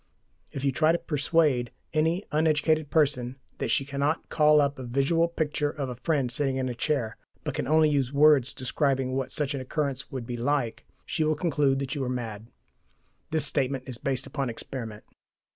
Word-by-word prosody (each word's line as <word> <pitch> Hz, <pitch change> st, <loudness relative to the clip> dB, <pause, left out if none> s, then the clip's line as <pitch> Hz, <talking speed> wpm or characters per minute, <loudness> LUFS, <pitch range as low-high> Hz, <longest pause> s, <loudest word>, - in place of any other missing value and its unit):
If 135 Hz, -, -5 dB
you 135 Hz, -, +3 dB
try 155 Hz, +4 st, +3 dB
to 170 Hz, -, +2 dB
persuade 150 Hz, -5 st, +1 dB, 0.2 s
any 165 Hz, +5 st, +1 dB
uneducated 155 Hz, 0 st, +2 dB
person 135 Hz, -5 st, +1 dB, 0.2 s
that -, -, -1 dB
she 135 Hz, -, +2 dB
cannot 140 Hz, +3 st, -1 dB
call 150 Hz, -1 st, +5 dB
up 140 Hz, -1 st, +1 dB
a -, -, -5 dB
visual 140 Hz, +7 st, +2 dB
picture 150 Hz, -3 st, -1 dB
of 140 Hz, -3 st, -4 dB
a 125 Hz, -, -5 dB
friend 135 Hz, -3 st, 0 dB
sitting 135 Hz, 0 st, 0 dB
in 130 Hz, -1 st, -1 dB
a 125 Hz, -, -2 dB
chair, 120 Hz, -3 st, -1 dB, 0.3 s
but -, -, -3 dB
can -, -, -2 dB
only 155 Hz, +1 st, +5 dB
use 140 Hz, -4 st, +1 dB
words 145 Hz, -3 st, +5 dB
describing 135 Hz, 0 st, 0 dB
what 130 Hz, 0 st, -2 dB
such 150 Hz, -1 st, 0 dB
an 140 Hz, -, -3 dB
occurrence 140 Hz, 0 st, -2 dB
would 130 Hz, -4 st, -5 dB
be 120 Hz, 0 st, -4 dB
like, 125 Hz, -1 st, -1 dB, 0.2 s
she 160 Hz, -, -1 dB
will 155 Hz, 0 st, +2 dB
conclude 145 Hz, -4 st, +1 dB
that 135 Hz, -1 st, -3 dB
you 140 Hz, -, -2 dB
are 125 Hz, -, -2 dB
mad. 115 Hz, -4 st, -4 dB, 0.8 s
(This 160 Hz, -1 st, +1 dB
statement 135 Hz, -1 st, 0 dB
is 125 Hz, -3 st, -6 dB
based 135 Hz, -1 st, -1 dB
upon 135 Hz, -4 st, -3 dB
experiment.) 115 Hz, -2 st, -6 dB
140 Hz, 190 wpm, -27 LUFS, 130-150 Hz, 0.8 s, call